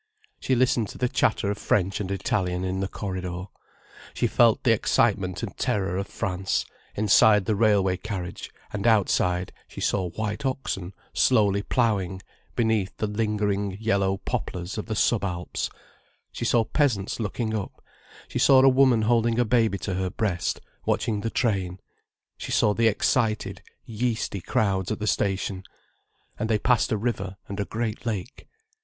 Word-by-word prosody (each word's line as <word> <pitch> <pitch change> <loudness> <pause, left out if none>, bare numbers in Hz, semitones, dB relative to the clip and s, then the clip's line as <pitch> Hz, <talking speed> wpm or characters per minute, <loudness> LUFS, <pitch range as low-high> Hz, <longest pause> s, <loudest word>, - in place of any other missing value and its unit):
She 130 - +1
listened 120 -3 +2
to - - -9
the 125 - +1
chatter 110 -4 +1
of 105 - -5
French 95 -1 +1
and 100 -3 -3
Italian 90 -2 -1
in 95 0 -2
the 95 - -1
corridor. 90 -3 -4 0.7
She - - +1
felt 115 -2 +4
the 120 - +4
excitement 100 -4 +1
and 100 -5 -5
terror 100 -7 -1
of 100 0 -3
France, 95 0 -2 0.3
inside 105 -1 +5
the 110 - +1
railway 100 -3 +3
carriage: 95 -4 -6 0.2
and 105 +2 -1
outside 90 -4 +2
she - - -10
saw 95 -3 0
white 105 +5 -4
oxen 100 -9 -3 0.2
slowly 100 -5 +3
ploughing, 100 -6 0 0.4
beneath 110 -4 0
the - - -1
lingering 105 -2 -1
yellow 100 -3 +1
poplars 90 -1 -4
of 105 - -6
the 110 - -2
sub 110 +1 +2
Alps, 90 -2 -3 0.6
she - - -4
saw 115 -2 +3
peasants 110 -5 0
looking 110 +1 -2
up, 105 -3 -4 0.5
she - - -3
saw 130 -1 +6
a - - +7
woman 130 -4 +4
holding 115 0 +2
a 120 - +3
baby 110 -3 +2
to 100 - -4
her 95 0 -1
breast, 90 -3 -2 0.2
watching 105 -2 0
the 115 - -2
train, 95 -6 -1 0.6
she - - -6
saw 105 - +3
the 115 +2 +3
excited, 110 0 0 0.2
yeasty 115 -3 -2
crowds 95 0 0
at 110 - -1
the 105 - -4
station. 95 -2 0 0.8
And 110 +1 -1
they 110 - +3
passed 120 +2 +2
a 110 - +2
river, 100 -4 -3
and 100 +1 -6
a 100 - 0
great 110 0 -3
lake. 110 0 -5
105 Hz, 160 wpm, -25 LUFS, 95-115 Hz, 0.8 s, a